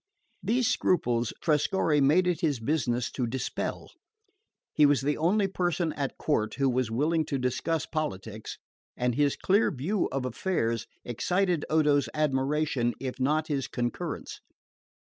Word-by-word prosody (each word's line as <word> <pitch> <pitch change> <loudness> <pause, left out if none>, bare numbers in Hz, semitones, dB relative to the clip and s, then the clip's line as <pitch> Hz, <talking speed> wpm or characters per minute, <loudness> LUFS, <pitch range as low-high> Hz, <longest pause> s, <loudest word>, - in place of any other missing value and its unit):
These 235 +4 +1
scruples 120 -9 +1
Trescorre 155 -1 +2
made 155 +7 +4
it 180 -1 0
his 150 -7 +1
business 120 -2 0
to 125 -3 -2
dispel. 130 +3 -4 0.8
He 150 - +4
was 145 -2 +5
the 145 +2 0
only 195 +6 +2
person 175 -3 -1
at 140 -2 -3
court 110 -8 0
who 135 0 +2
was 125 -2 0
willing 155 +8 +1
to 140 - -2
discuss 135 +5 -1
politics, 110 -8 -4 0.4
and 125 0 +1
his 145 +2 +2
clear 200 +4 +2
view 180 +6 -1
of 135 -1 -2
affairs 115 - -1 0.2
excited 175 - 0
Odo's 150 -2 +3
admiration 140 -3 +1
if 130 -1 -5
not 150 +4 +1
his 140 -4 -2
concurrence. 120 -1 -4
145 Hz, 140 wpm, -28 LUFS, 125-165 Hz, 0.8 s, was